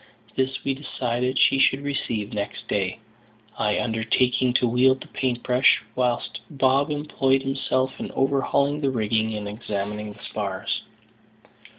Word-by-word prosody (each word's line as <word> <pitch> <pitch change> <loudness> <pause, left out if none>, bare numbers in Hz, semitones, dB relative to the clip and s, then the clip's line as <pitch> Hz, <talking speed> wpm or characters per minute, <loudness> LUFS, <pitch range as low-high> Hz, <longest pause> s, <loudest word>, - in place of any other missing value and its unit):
This 130 0 -1
we 135 - 0
decided 130 -2 -2
she 135 - +5
should 135 +1 +3
receive 120 -7 -2
next 105 +1 -4
day, 95 -2 -1 0.6
I 105 0 +1
undertaking 125 +3 +1
to 125 - +3
wield 130 +3 +3
the - - -9
paint 125 -2 -2
brush 125 -1 +4
whilst 120 -4 -1
Bob 135 +1 +2
employed 135 -3 +1
himself 135 -1 -1
in - - -4
overhauling 140 +2 +1
the 140 - +2
rigging 110 -2 0
and 105 -1 -4
examining 105 0 -4
the - - -17
spars. - - -3
125 Hz, 135 wpm, -24 LUFS, 110-135 Hz, 0.6 s, she